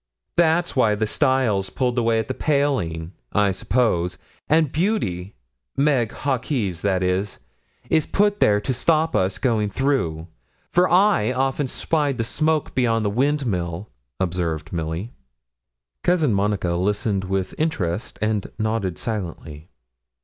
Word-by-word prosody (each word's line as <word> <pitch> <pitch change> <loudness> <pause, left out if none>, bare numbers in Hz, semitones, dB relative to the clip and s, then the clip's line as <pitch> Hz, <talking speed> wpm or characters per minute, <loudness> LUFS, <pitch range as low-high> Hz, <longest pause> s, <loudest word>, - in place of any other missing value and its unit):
'That's 170 +1 +2
why 110 -5 +3
the 110 +1 0
stile's 120 -6 +1
pulled 125 -2 -1
away 115 -2 +2
at 110 -1 -1
the 130 - -2
paling, 130 - 0 0.2
I 105 -1 +3
suppose; 95 -4 0 0.3
and 155 -2 +3
Beauty 110 - -1 0.4
Meg 135 -6 +2
Hawkes, 125 - -2
that 95 -2 +1
is 95 +2 -1 0.5
is 155 - +2
put 205 0 +2
there 105 0 +4
to 130 - -1
stop 160 +5 +1
us 95 0 +1
going 105 -1 +1
through; 100 - 0 0.5
for 180 +1 +3
I 180 - +4
often 135 +2 0
spied 145 0 0
the 115 - 0
smoke 155 +6 0
beyond 115 -3 +1
the 100 - +1
windmill,' 105 - -1 0.3
observed 85 -3 -2
Milly. 85 +6 -3 0.9
Cousin 160 -9 +3
Monica 100 -2 0
listened 100 +2 0
with 95 0 -2
interest, 105 - -1
and 110 -2 -1
nodded 110 -5 -1
silently. 85 -7 -5
110 Hz, 130 wpm, -22 LUFS, 95-140 Hz, 0.9 s, there